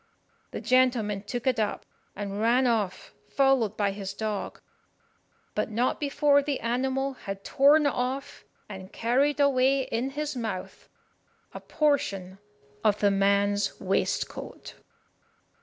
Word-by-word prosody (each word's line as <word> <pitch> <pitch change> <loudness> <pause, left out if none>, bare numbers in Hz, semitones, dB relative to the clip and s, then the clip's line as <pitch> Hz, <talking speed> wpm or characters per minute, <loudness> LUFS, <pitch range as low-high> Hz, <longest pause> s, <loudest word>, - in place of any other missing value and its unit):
The - - -6
gentleman 240 -4 +2
took 235 +3 -5
it 255 -3 +1
up, 210 -2 -2 0.3
and 200 0 -4
ran 240 +3 +3
off, 215 -6 -1 0.2
followed 270 -6 +2
by 200 -2 +1
his 195 -1 -6
dog, 215 -2 -4 0.9
but - - -1
not 235 +4 0
before 285 0 +3
the 280 -1 -2
animal 265 +3 -1
had 195 -5 -7
torn 290 +3 +4
off 260 0 -2 0.2
and 190 -2 -9
carried 275 +6 +1
away 275 -1 +3
in 245 +2 -2
his 290 +1 -4
mouth 220 -6 -5 0.6
a - - -6
portion 195 - -1 0.4
of 210 -1 +2
the 205 -1 +3
man's 200 +1 +1
waistcoat. 190 0 -2
235 Hz, 125 wpm, -27 LUFS, 200-270 Hz, 0.9 s, torn